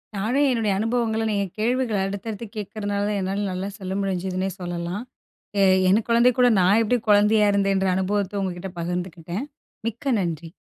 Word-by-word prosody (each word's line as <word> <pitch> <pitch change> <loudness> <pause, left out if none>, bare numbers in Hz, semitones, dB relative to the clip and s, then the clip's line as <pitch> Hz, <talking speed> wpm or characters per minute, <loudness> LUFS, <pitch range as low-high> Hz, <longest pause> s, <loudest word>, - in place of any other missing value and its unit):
நானும் 245 +9 +1
என்னுடைய 225 -4 +1
அனுபவங்கள்ல 225 0 0
நீங்க 200 -1 0
கேள்விகள் 235 -3 +1
அடுத்தடுத்து 205 +3 -5
கேட்கிறனால 205 0 -3
தான் 205 -1 -1
என்னால 195 +2 -1
நல்லா 185 +2 -3
சொல்ல 190 0 -4
முடிஞ்சுதுனே 190 0 -2
சொல்லலாம். 175 +3 -4 0.6
எ - - +6 0.3
என் 210 +4 +3
குழந்தை 235 +2 +5
கூட 250 - +6
நான் 195 +5 +4
எப்படி 245 +3 +2
குழந்தையா 210 +1 +5
இருந்தேன்ற 195 -1 +2
அனுபவத்த 200 +1 -1
உங்ககிட்ட 185 0 -4
பகிர்ந்துக்கிட்டேன். 175 - -4 0.4
மிக்க 245 +4 -1
நன்றி! 165 -2 -3
200 Hz, 145 wpm, -24 LUFS, 185-220 Hz, 0.6 s, எ